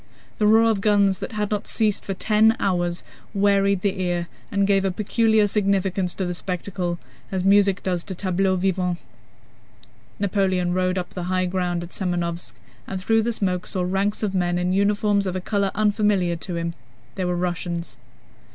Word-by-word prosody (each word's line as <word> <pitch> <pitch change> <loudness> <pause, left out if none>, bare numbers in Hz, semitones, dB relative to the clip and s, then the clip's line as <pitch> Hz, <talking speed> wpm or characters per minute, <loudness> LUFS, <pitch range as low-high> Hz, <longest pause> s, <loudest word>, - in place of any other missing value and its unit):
The 210 - +4
roar 225 +1 +6
of 200 -3 -1
guns, 200 -2 +3
that - - -6
had 210 -1 -2
not 210 -1 -2
ceased 215 -3 0
for 195 - -3
ten 220 +3 +3
hours, 175 -2 0 0.3
wearied 200 -1 +3
the 195 -2 0
ear 175 -1 -1 0.2
and 200 -1 +2
gave 195 -1 +3
a 195 - +1
peculiar 220 +3 +2
significance 195 -3 0
to 190 - -2
the 180 - -2
spectacle, 180 0 -3 0.3
as 190 -2 -1
music 200 0 +4
does 180 -2 -1
to 190 - -5
tableaux 190 +1 +1
vivants. 180 -1 0 1.2
Napoleon 190 -3 +1
rode 185 0 +1
up 180 -1 -3
the 180 -2 -5
high 185 0 +1
ground 180 -1 -1
at 170 - -8
Semënovsk, 175 -2 -2 0.3
and 190 - -4
through 225 +4 +2
the 235 +2 0
smoke 185 -5 -1
saw 185 - -1
ranks 195 +4 0
of 200 -2 0
men 175 -2 +1
in 180 +1 0
uniforms 200 0 +2
of 185 - -2
a - - -1
color 200 +1 0
unfamiliar 205 -4 +2
to 170 +2 -4
him. 170 0 -2 0.4
They 190 - -3
were 180 0 0
Russians. 175 -1 -3
190 Hz, 180 wpm, -23 LUFS, 180-200 Hz, 1.2 s, roar